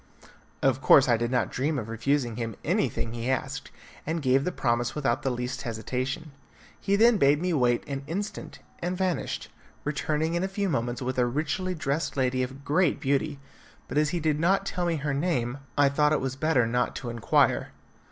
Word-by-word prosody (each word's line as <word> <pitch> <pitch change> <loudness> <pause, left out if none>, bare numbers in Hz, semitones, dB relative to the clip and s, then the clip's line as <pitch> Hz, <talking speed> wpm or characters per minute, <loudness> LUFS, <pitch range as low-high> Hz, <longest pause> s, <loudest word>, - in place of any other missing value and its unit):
Of - - +2
course - - +7
I 120 - +4
did 120 +1 -1
not 125 -2 0
dream 145 +4 -1
of 115 -4 -4
refusing 120 +1 0
him 115 -3 -3
anything 115 - 0
he 120 +1 -3
asked, 130 - -2 0.3
and 160 +2 -2
gave 135 -1 +2
the 180 - 0
promise 120 -4 0
without 135 -6 0
the 135 - 0
least 125 +1 -3
hesitation. 130 +6 -3 0.5
He 200 - +1
then 225 +1 +5
bade 145 0 +4
me 180 +1 0
wait 125 -5 +2
an 135 -1 -3
instant, 200 +7 -5 0.2
and 180 +1 -2
vanished, 185 -5 -2 0.3
returning 150 +2 -1
in 175 +1 0
a - - +1
few 195 0 -2
moments 120 -3 -1
with 130 0 -2
a 120 - +3
richly 160 +8 -1
dressed 150 0 -2
lady 130 -1 +1
of 135 +2 -5
great 160 +2 +2
beauty, 140 +2 0 0.5
but 145 - 0
as 150 -1 +2
he 175 - -1
did 155 -2 +1
not 195 +4 +2
tell 180 -2 -1
me 170 - +1
her 145 -1 -2
name, 140 -4 -1 0.2
I 145 -1 +6
thought 150 +2 +3
it - - +2
was 135 0 -3
better 140 -4 +2
not 125 +2 0
to 120 -2 -4
inquire. 115 -1 +2
140 Hz, 195 wpm, -27 LUFS, 125-160 Hz, 0.5 s, course